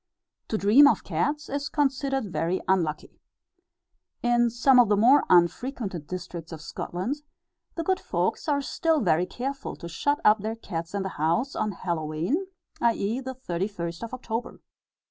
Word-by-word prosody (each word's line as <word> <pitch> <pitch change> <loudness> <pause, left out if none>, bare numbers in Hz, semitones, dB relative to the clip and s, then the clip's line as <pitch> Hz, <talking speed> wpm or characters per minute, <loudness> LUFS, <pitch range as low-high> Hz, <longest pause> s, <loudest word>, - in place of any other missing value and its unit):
To 220 - -1
dream 225 +9 +7
of - - +2
cats 300 +1 -1
is 285 +1 -3
considered 270 - 0
very 175 +3 0
unlucky. 170 -5 -1 1.0
In 240 0 +3
some 250 +3 +4
of 240 -4 +5
the 205 - +3
more 255 +7 +6
unfrequented 180 - +1
districts 175 -2 -7
of 160 - -7
Scotland, 180 - -4 0.6
the 330 - -2
good 375 +2 +1
folks - - -2
are 285 -1 +1
still 320 +2 +1
very 175 -3 +2
careful 270 +6 -5
to 170 - -8
shut 285 - 0
up 210 +1 +6
their 220 +3 -3
cats 170 -4 -6
in 200 - -1
the 190 - -3
house, 170 - +1
on 210 -1 -1
Hallowe'en, 170 - -2 0.3
i.e., 230 0 +1
the 260 0 -6
31st 175 -6 -4
of 230 0 -6
October. 235 -2 -5
220 Hz, 155 wpm, -26 LUFS, 175-270 Hz, 1.0 s, dream